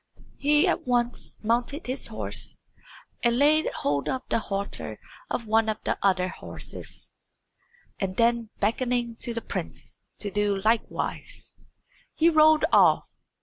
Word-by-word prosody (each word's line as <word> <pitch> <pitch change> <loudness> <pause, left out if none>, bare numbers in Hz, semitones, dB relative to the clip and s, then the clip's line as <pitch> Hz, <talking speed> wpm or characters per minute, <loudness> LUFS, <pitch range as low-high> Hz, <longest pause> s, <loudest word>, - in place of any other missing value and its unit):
He 295 +1 +4
at - - 0
once 240 -1 0
mounted 240 +7 0
his 255 +2 -2
horse - - -4 0.6
and 235 -1 +3
laid 300 +3 +4
hold 140 0 -1
of 260 -1 -2
the - - +2
halter 200 -2 -3 0.3
of 235 - -2
one 220 0 +3
of 215 - -1
the - - 0
other 185 -2 +2
horses, 185 - -5 0.9
and 190 -2 -2
then 235 -1 +2
beckoning 240 +2 0
to 240 - -2
the 230 - -2
prince - - -5 0.2
to 205 - -3
do 205 -1 +1
likewise, 220 +3 -2 0.6
he 330 +1 +4
rode 310 0 +6
off. - - +6
235 Hz, 135 wpm, -26 LUFS, 210-260 Hz, 0.9 s, rode